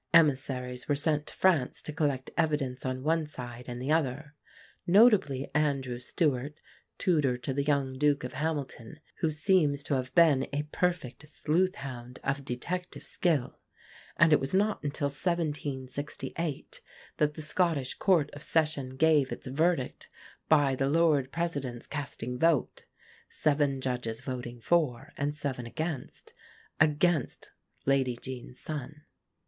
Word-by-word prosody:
Emissaries 130 -5 +2
were 145 - +3
sent 150 +1 +1
to - - -7
France 165 -9 +2
to 155 - -5
collect 145 -4 -1
evidence 140 -6 0
on 130 0 -3
one 160 0 +1
side 125 -4 -8
and 120 -1 -5
the 130 +4 -2
other; 145 -1 0 0.5
notably 180 - +4
Andrew 140 -5 0
Stewart, 145 +1 -1 0.4
tutor 150 -8 +2
to 125 +2 -4
the 140 - 0
young 140 -2 0
Duke 145 -1 +2
of 125 - -5
Hamilton, 145 -3 -4 0.2
who 160 - +2
seems 150 -2 +2
to 145 - -2
have 130 -1 -1
been 155 -6 +5
a 145 +1 -1
perfect 165 -5 -2
sleuth 175 +5 +1
hound 125 -2 -8
of 140 +1 -1
detective 170 +8 -4
skill; 155 -8 0 0.6
and 165 -1 +6
it - - +6
was 135 +7 0
not 205 0 +1
until 145 +1 -1
1768 145 -1 -3 0.4
that 150 -1 +1
the - - -5
Scottish 155 -5 0
Court 170 -7 +2
of 145 - -10
Session 150 -6 0
gave 150 -2 +3
its - - -6
verdict, 140 +1 0 0.4
by 145 -3 +5
the 135 +1 0
Lord 150 -4 +3
President's 140 -8 -3
casting 125 -4 -5
vote 165 -3 +1 0.4
(seven 145 -3 +1
judges 125 -3 -3
voting 125 -2 -5
for 140 -3 0
and 145 0 -2
seven 130 -5 -3
against) 155 +2 -5 0.5
against 155 0 +2 0.3
Lady 135 -3 +2
Jean's 125 -1 -8
son. 150 0 -6
145 Hz, 140 wpm, -29 LUFS, 130-160 Hz, 0.6 s, and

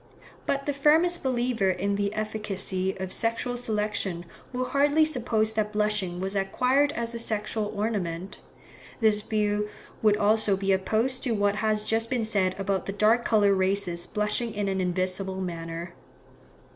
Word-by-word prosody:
But 275 0 0
the 290 - 0
firmest 320 +5 +3
believer 240 -5 +1
in 200 +2 0
the 200 0 0
efficacy 200 -3 -2
of 185 0 -3
sexual 230 +2 -1
selection 210 -6 -2 0.3
will 255 0 -2
hardly 290 +4 +3
suppose 225 -7 0
that 215 -1 -1
blushing 210 -4 -1
was 190 +2 -2
acquired 255 +9 +2
as 235 0 -3
a 235 - -3
sexual 215 -1 -1
ornament. 195 -4 -3 0.6
This 215 -3 +4
view 210 -1 0 0.3
would 210 -1 +4
also 210 -1 +3
be 195 0 0
opposed 220 +7 +1
to 245 - -1
what 205 0 +1
has 215 -1 +1
just 225 +1 0
been 245 -4 0
said 190 -4 +1
about 195 -1 -1
the 195 - -2
dark 220 +4 +3
coloured 205 -3 +4
races 185 -2 0
blushing 210 +2 -1
in 205 -1 -1
an 190 -1 0
invisible 185 +1 -1
manner. 170 -1 -5
210 Hz, 155 wpm, -27 LUFS, 195-230 Hz, 0.6 s, This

